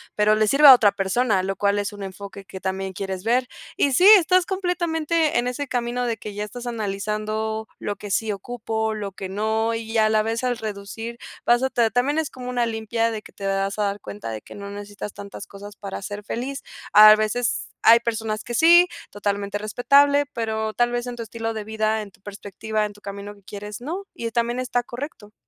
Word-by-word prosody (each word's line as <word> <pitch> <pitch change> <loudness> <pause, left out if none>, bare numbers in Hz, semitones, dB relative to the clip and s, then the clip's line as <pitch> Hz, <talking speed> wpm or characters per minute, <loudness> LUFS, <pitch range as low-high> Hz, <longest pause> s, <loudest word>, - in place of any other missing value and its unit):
pero 210 0 +4
le 215 0 +2
sirve 285 +6 +6
a 265 - +13
otra 215 -5 +5
persona, 195 0 +1
lo 195 +1 -2
cual 200 +1 +1
es 205 +1 -2
un 205 - -10
enfoque 195 0 -8
que 190 - -9
también 190 0 -3
quieres 190 0 -5
ver. 245 +2 +2 0.3
Y 280 - +3
sí, 360 +9 +5
estás 365 -1 +4
completamente 335 -5 0
en 245 - -1
ese 285 +3 -4
camino 245 0 -1
de 235 -2 -1
que 210 -1 -8
ya 210 +1 -3
estás 240 +4 -8
analizando 215 0 -3
lo 205 - -4
que 205 -1 -8
sí 220 +1 +1
ocupo, 220 +1 -3
lo 205 -2 -5
que 190 0 -7
no 220 +3 0
y, 225 0 -3
a 215 - +5
la 215 0 +2
vez, 230 +3 -2
al 245 -1 0
reducir, 220 +2 -6 0.3
vas 240 +1 +4
a 265 - +2
ta 235 -3 +2
también 260 +6 +1
es 320 -3 0
como 250 -1 -8
una 245 -1 +1
limpia 225 0 -1
de 215 -1 -4
que - - -16
te 200 - -8
vas 195 +1 -1
a 210 - +1
dar 200 0 -1
cuenta 205 - -7
de 110 -1 -5
que - - -13
no 200 0 -7
necesitas 205 0 -7
tantas 200 0 -9
cosas 205 +1 -11
para 195 0 -7
ser 205 +1 -6
feliz. 260 +5 -4 0.3
A 215 0 +10
veces 230 +3 -1
hay 230 +1 +7
personas 225 -2 -3
que 240 - -5
sí, 345 +6 +7 0.2
totalmente 200 0 -2
respetable, 280 +7 +3
pero 220 -2 -2
tal 240 0 +1
vez 240 0 -2
en 245 -1 -6
tu 230 - -4
estilo 225 +1 -4
de 215 -1 -5
vida, 220 0 0
en 205 -2 -9
tu 190 - -26
perspectiva, 210 +1 -4
en 205 - -6
tu 205 - -19
camino 200 0 -7
que 200 - -22
quieres, 205 +2 -8
no, 345 +10 -5
y 230 -1 -5
también 235 +2 0
está 245 -1 0
correcto. 240 -4 -8
220 Hz, 220 wpm, -23 LUFS, 205-245 Hz, 0.3 s, a